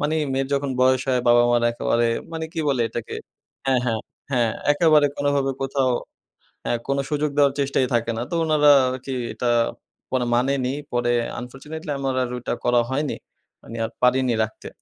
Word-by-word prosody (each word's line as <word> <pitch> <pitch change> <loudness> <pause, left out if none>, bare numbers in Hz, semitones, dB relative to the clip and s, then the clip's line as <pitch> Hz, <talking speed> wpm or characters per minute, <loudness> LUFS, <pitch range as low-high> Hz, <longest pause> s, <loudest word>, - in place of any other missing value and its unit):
মানি 150 +2 0 0.2
মেয়ের 135 0 -1
যখন 140 0 -1
বয়স 130 0 +4
হয়, 125 -1 +2
বাবা-মারা 120 0 +4
একেবারে 120 0 +1 0.3
মানি 160 0 -3
কি 165 - -1
বলে 135 -3 +1
এটাকে 115 -1 -5 0.5
হ্যাঁ, 130 -2 +3
হ্যাঁ, 120 -2 0 0.4
হ্যাঁ 120 -4 +2 0.2
একেবারে 150 -1 +4
কোনোভাবে 145 -1 +1
কোথাও 135 -1 +1 0.7
হ্যাঁ, 120 - 0
কোনো 140 0 +1
সুযোগ 150 0 0
দেওয়ার 140 -2 +4
চেষ্টাই 135 -1 +1
থাকে 115 0 +1
না। 115 - -2
তো - - -3
উনারা 150 -2 +4 0.2
আরকি 130 +1 -5 0.2
এটা 120 - -1 0.6
পরে 130 -1 0
মানেনি 130 +1 +1 0.2
পরে 120 0 +1 0.3
আনফরচুনেটলি 150 +6 -8
আমার 135 -1 -1
আর 125 - -2
ওইটা 125 - -4
করা 120 0 +4
হয়নি। 145 +2 -1 0.5
মানি 115 - -9
আর 110 - -3
পারিনি 125 -1 +3
রাখতে। 110 - -9
130 Hz, 165 wpm, -23 LUFS, 120-145 Hz, 0.7 s, বয়স